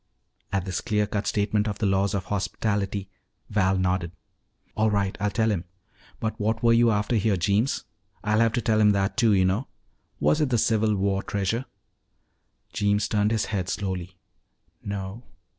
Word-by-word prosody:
At 95 -1 -1
this 95 -2 -2
clean 105 -2 +1
cut 100 0 -3
statement 105 0 +1
of 105 -1 -2
the 110 - -1
laws 100 +1 +1
of 95 -1 -2
hospitality, 100 0 -2 0.4
Val 95 -2 +2
nodded. 90 -2 0 0.6
"All 110 0 +2
right. 100 -2 0
I'll 105 +1 +1
tell 110 +2 +1
him. 90 -4 -2 0.5
But 110 -1 -3
what 110 +2 -1
were 115 0 +5
you 115 0 +5
after 105 +2 +1
here, 105 -2 +2
Jeems? 100 +8 +1 0.4
I'll 105 +1 +2
have 115 -1 +3
to 120 - 0
tell 110 0 +2
him 105 -1 +5
that, 100 0 0
too, 115 -4 +4
you 95 -2 +4
know. 100 +8 0 0.5
Was 155 - +2
it 150 - +2
the 120 - +2
Civil 110 -1 +2
War 100 0 0
treasure?" 100 +6 -2 1.1
Jeems 105 -1 +1
turned 105 -1 +1
his 110 -1 0
head 95 -2 -1
slowly. 95 -2 -4 0.7
"No." 100 +2 -5
105 Hz, 175 wpm, -25 LUFS, 95-110 Hz, 1.1 s, were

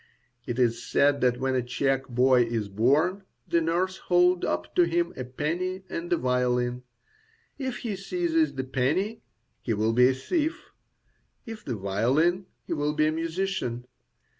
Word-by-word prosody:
It 120 -1 -3
is 120 -2 +2
said 140 0 +2
that 125 -1 +2
when 130 0 0
a 130 - +1
Czech 135 +2 -1
boy 125 0 +4
is 115 -3 -3
born, 145 - +2 0.3
the 170 - +2
nurse 180 +3 0
holds 180 0 +3
up 85 0 -2
to 175 - +4
him 170 0 0
a 130 - -4
penny 175 +9 -3
and 170 +1 -5
a 175 - +4
violin; 125 -1 0 0.8
if 260 -3 -3
he 215 -3 -1
seizes 325 - 0
the 130 - -2
penny, 145 - -1 0.4
he 115 - -1
will 110 +2 +1
be 125 +2 +6
a 130 - 0
thief; 315 - -2 0.7
if 225 -2 -8
the 125 - -3
violin, 130 - +1 0.2
he - - -3
will 150 -1 0
be 155 0 +2
a 155 - +2
musician. 165 -6 -2
145 Hz, 165 wpm, -27 LUFS, 125-180 Hz, 0.8 s, be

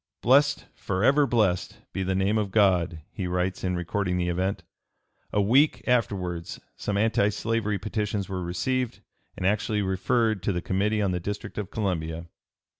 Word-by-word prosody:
"Blessed, 140 +4 +4
forever 135 +10 +2
blessed, 105 -8 +1 0.2
be 95 - -2
the 95 0 0
name 100 +3 +2
of 105 -2 -1
God!" 90 -5 +2
he 95 - -4
writes 90 +1 -1
in 90 -1 0
recording 90 +1 -1
the 90 0 0
event. 95 +3 -1 0.7
A - - +1
week 130 +9 +3
afterwards 95 -8 -1 0.2
some 105 -1 -2
anti 105 -1 +3
slavery 105 0 -1
petitions 105 -1 -2
were 95 -2 -3
received 115 +9 -2 0.4
and - - -3
actually 105 +1 +1
referred 110 +2 +1
to - - 0
the 90 - -1
Committee 105 +4 0
on 95 - +1
the 90 - -1
District 105 +4 -5
of 100 - -4
Columbia. 85 -5 -2
100 Hz, 160 wpm, -26 LUFS, 90-110 Hz, 0.7 s, Blessed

